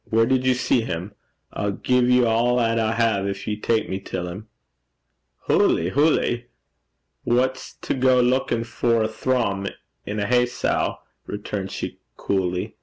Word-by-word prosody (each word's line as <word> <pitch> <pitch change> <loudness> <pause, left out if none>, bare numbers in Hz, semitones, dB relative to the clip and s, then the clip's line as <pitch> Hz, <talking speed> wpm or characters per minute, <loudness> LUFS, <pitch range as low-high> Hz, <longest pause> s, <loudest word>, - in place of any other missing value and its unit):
'Where 115 0 +3
did 130 +1 +1
you 130 - +4
see 125 -1 +2
him? 90 -1 -5 0.4
I'll 100 -1 -2
gie 125 +5 +1
ye 125 0 +4
a' - - +3
'at 115 0 +2
I 110 0 +1
hae 100 -4 +1
gin - - -12 0.2
ye'll 105 - -7
tak 115 -1 +1
me 95 - -3
till 90 -2 -5
him.' 95 +5 -8 1.0
'Hooly! 85 +2 +3
hooly! 125 -2 +1 0.8
Wha's 130 +2 0
to - - -1
gang 125 -1 +3
luikin' 125 -3 0
for 115 0 +1
a - - +1
thrum 110 -4 -1 0.4
in 105 +1 -4
a 100 - 0
hay 125 +2 +3
sow?' 125 - -1 0.3
returned 105 -1 -4
she, - - -6 0.2
coolly. 90 -2 -2
115 Hz, 160 wpm, -23 LUFS, 100-125 Hz, 1.0 s, you